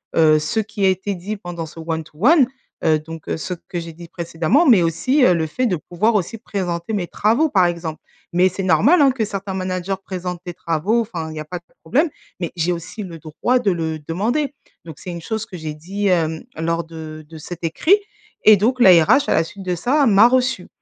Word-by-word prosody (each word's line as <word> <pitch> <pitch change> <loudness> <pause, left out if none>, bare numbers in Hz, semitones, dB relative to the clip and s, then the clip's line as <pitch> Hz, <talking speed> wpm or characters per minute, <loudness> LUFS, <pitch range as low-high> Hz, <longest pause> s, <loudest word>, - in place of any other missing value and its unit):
heu, 155 -1 +5
ce 220 +9 -1
qui 210 -2 -2
a 190 - +6
été 190 +2 -1
dit 195 +4 -5
pendant 175 -4 -6
ce 165 +1 -10
one 160 -1 -3
to 150 - -20
one, 295 -3 +6 0.4
heu, 155 -1 +4
donc, 160 +1 -10
heu, - - -1
ce 180 +3 -4
que 175 0 -6
j'ai 165 - -8
dit 170 +1 -11
précédemment. 170 - +1
Mais 225 - +6
aussi, 210 - +2
heu, 180 - +6
le 160 -1 0
fait 250 +12 -2
de 190 - +1
pouvoir 190 +7 0
aussi 210 +4 -1
présenter 180 -2 -3
mes 190 -4 -1
travaux, 230 - +2
par 185 -6 +4
exemple. 170 -2 -4 0.3
Mais 180 +2 +4
c'est 195 +2 -5
normal, 205 - +4
hein, 275 -2 +6
que 250 -3 -2
certains 195 -2 -4
managers 185 0 -2
présentent 180 -2 -5
des 175 - -5
travaux 170 +9 0
enfin 175 -8 -5
il - - -8
y 155 - -5
a 155 - -6
pas 175 +3 -6
de - - -38 0.2
problème. 285 - +2 0.3
Mais 170 - -3
j'ai 170 +1 0
aussi 170 +5 -5
le 170 -4 -9
droit 165 +11 0
de 205 -5 +1
le 160 -2 -2
demander. 230 - -1 0.3
Donc 160 -3 -9
c'est 180 - -8
une 170 - -6
chose 220 +4 -3
que 190 -5 -9
j'ai 155 -2 -5
dit, 195 +6 -3
hem, 160 -3 +1
lors 165 +1 -1
de 155 -1 -9
de 160 - -10
cet 175 +3 -9
écrit 320 - +3 0.5
et 215 -1 +9
donc 240 +6 +1
la 195 -6 +8
RH 270 - +3
à - - +3
la 165 - +3
suite 195 +4 -10
de 180 -1 -1
ça 270 - +2
m'a 215 +2 +7
reçue. 255 -6 +1
180 Hz, 235 wpm, -20 LUFS, 165-215 Hz, 0.5 s, et